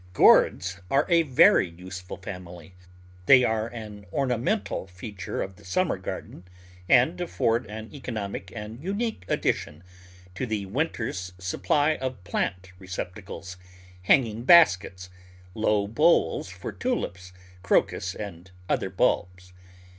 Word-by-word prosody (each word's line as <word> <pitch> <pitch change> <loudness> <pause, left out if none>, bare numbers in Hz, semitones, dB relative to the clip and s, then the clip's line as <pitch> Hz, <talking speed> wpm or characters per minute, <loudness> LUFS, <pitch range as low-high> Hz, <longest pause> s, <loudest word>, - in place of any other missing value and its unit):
Gourds 90 0 +4
are 140 - +3
a 170 -1 +5
very 130 - +5
useful 90 +1 -9
family. 90 -3 -9 0.5
They 130 -2 +8
are 110 -1 0
an 105 -4 -9
ornamental 130 - -1
feature 95 +1 -5
of 95 -1 -9
the - - -18
summer 130 - 0
garden, 90 -1 -7 0.5
and 155 +8 +4
afford 115 -9 0
an 110 +1 -8
economic 105 -9 -5
and 110 +5 -8
unique 200 - -3
addition 75 +4 -1 0.5
to 125 +7 -3
the 105 -3 -2
winter's 100 - -3
sup 95 0 -5
ply 150 +1 +2
of 130 -7 -5
plant 90 0 -3
receptacles, 95 0 -7 0.4
hanging 115 +3 +2
baskets, 95 - +5 0.4
low 105 -1 +1
bowls 115 - +2
for 90 0 -7
Tulips, 95 - -3 0.3
Crocus, 95 +1 +1
and 95 -3 -8 0.2
other - - 0
bulbs. 90 0 -1
105 Hz, 120 wpm, -26 LUFS, 90-125 Hz, 0.5 s, They